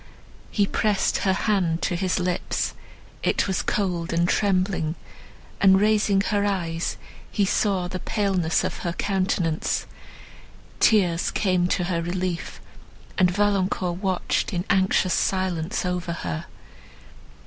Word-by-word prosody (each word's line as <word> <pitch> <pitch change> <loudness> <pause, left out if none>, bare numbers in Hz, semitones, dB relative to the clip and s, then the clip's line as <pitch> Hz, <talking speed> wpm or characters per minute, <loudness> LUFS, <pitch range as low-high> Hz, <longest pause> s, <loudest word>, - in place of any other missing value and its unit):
He 205 - +2
pressed 210 0 +1
her 190 - +2
hand 185 -5 0
to 175 - 0
his 185 +1 0
lips, 180 0 -1 0.5
it - - +1
was 190 -2 0
cold 180 -5 -1
and 170 +1 +2
trembling; 185 -5 +1 0.7
and, 190 -1 +6
raising 210 -1 +3
her 205 0 0
eyes, 175 -5 -1 0.3
he 205 - +1
saw 195 -2 +1
the 185 +1 -5
paleness 190 -7 0
of - - -3
her 170 - -3
countenance. 185 -5 0 0.9
Tears 180 -6 +3
came 185 -3 +1
to 180 - 0
her 175 -1 -1
relief, 180 0 -3 0.6
and 180 -1 +5
Valancourt 190 -2 0
watched 190 -3 0
in 175 +1 -2
anxious 190 -1 +2
silence 185 -2 0
over 180 -1 -2
her. 85 - -4
185 Hz, 125 wpm, -24 LUFS, 175-195 Hz, 0.9 s, and